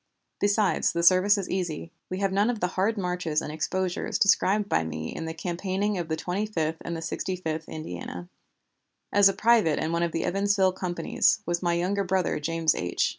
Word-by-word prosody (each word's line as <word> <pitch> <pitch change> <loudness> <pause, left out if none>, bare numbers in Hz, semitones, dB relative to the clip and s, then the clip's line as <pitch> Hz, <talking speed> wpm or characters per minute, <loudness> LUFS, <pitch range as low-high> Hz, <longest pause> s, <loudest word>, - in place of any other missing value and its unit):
Besides, 205 0 +2
the 170 0 -1
service 185 +4 +5
is 195 - -3
easy. 170 -3 -3 0.2
We 185 - -3
have 195 -1 +1
none 205 +4 +3
of 240 -3 -2
the 180 - 0
hard 200 +5 0
marches 180 -4 -1
and 150 - -5
exposures 175 +4 -2
described 200 +1 +3
by 80 - +1
me 80 0 -5
in 165 - -4
the 160 - -4
campaigning 190 +4 -2
of 170 - -3
the 160 - -1
Twenty 180 +6 -2
fifth 160 -6 -2
and 165 -1 -5
Sixty 185 +2 -3
fifth 160 -3 -4
Indiana. 90 - -7 0.9
As 200 -1 +7
a - - -1
private 215 -7 +3
in 160 - -1
one 170 0 0
of 170 -1 0
the 165 - -2
Evansville 195 0 +2
companies, 180 -2 +1
was 175 0 -1
my 170 -2 +1
younger 190 +4 0
brother 185 -3 0
James 165 +1 +1
H. 90 0 0
180 Hz, 195 wpm, -26 LUFS, 160-195 Hz, 0.9 s, As